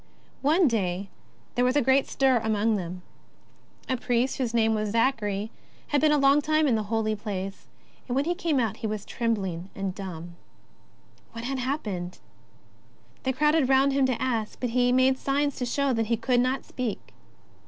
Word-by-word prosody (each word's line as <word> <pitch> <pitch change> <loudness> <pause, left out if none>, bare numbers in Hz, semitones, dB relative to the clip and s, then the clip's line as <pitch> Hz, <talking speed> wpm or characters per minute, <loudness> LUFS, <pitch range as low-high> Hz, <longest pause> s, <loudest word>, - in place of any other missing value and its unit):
One 315 +5 +4
day 195 -4 -1 0.4
there 245 - +1
was 255 +2 +2
a 290 - +4
great 265 +2 +3
stir 265 -3 +2
among 220 0 +1
them. 180 -1 -5 0.8
A 260 - +1
priest 245 +2 0
whose 250 -3 0
name 225 -1 +2
was 215 -1 -1
Zachary 220 -3 0 0.4
had 290 - +2
been 305 0 +4
a 300 - +4
long 275 +1 +5
time 310 +1 +2
in 255 - +3
the 220 - +1
Holy 220 -1 0
Place, 195 -2 -5 0.4
and 245 - -2
when 275 +2 +1
he 345 - +1
came 335 -6 0
out 225 -5 -1
he 220 - -3
was 210 -1 -4
trembling 195 -6 -2
— - - -32
and 195 -1 -3
dumb. 175 -3 -8 1.0
What 230 0 -7
had 270 +1 -2
happened? 210 - -3 1.0
They 260 - 0
crowded 300 +1 +2
round 270 +1 +4
him 270 -1 +3
to 255 -3 -1
ask, 230 -4 -2
but 250 -2 -2
he 245 +1 +3
made 260 +1 +3
signs 285 0 0
to 250 - -2
show 280 +2 +1
he 225 0 0
could 245 +2 +1
not 255 +2 0
speak. 245 -5 -5
245 Hz, 185 wpm, -26 LUFS, 215-270 Hz, 1.0 s, long